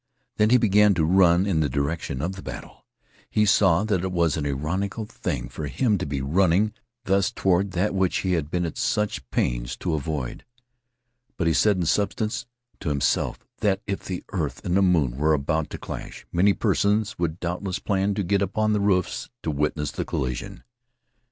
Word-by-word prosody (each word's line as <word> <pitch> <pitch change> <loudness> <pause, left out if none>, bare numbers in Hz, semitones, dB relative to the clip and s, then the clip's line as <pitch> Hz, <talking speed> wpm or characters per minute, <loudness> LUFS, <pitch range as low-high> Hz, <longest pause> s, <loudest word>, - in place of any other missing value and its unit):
Then 105 0 +4
he 125 - +6
began 105 -3 +4
to 80 -3 +2
run 90 +1 +4
in 95 -6 +1
the 75 -2 +1
direction 70 -2 -2
of 90 - -1
the 95 -1 -8
battle. 65 -7 -9 0.4
He 105 - +2
saw 95 -3 +4
that 100 -5 0
it 95 - -2
was 85 -4 +2
an 75 -2 -2
ironical 90 +10 -2
thing - - -4
for 75 +5 -6
him 105 - +1
to 90 - -3
be 70 -1 -2
running 90 +8 +2 0.3
thus 95 0 +2
toward 95 0 +1
that 95 +4 0
which 95 -2 +1
he 95 - -1
had 80 -4 -1
been 90 +1 -1
at 80 - -5
such 100 -12 -1
pains - - -1
to 85 - -2
avoid. 75 -4 -3 0.9
But 85 - 0
he 80 - +3
said, 105 +4 +3
in 90 - 0
substance, 105 +6 0 0.3
to - - -3
himself 70 -1 0
that 100 -1 +1
if 100 -1 -3
the 90 -2 -5
earth 75 -10 -3
and 90 - 0
the 100 - +4
moon 80 -10 +2
were 75 +2 +3
about 75 +2 0
to - - -6
clash, - - -8
many 100 +4 +4
persons 105 0 +1
would 85 0 -1
doubtless 90 +2 -3
plan 100 0 0
to 100 - -1
get 100 +2 +1
upon 110 +2 +1
the 105 - +1
roofs 95 -3 0
to 80 - -1
witness 75 0 -1
the - - -3
collision. 60 -1 -4
90 Hz, 190 wpm, -25 LUFS, 75-100 Hz, 0.9 s, he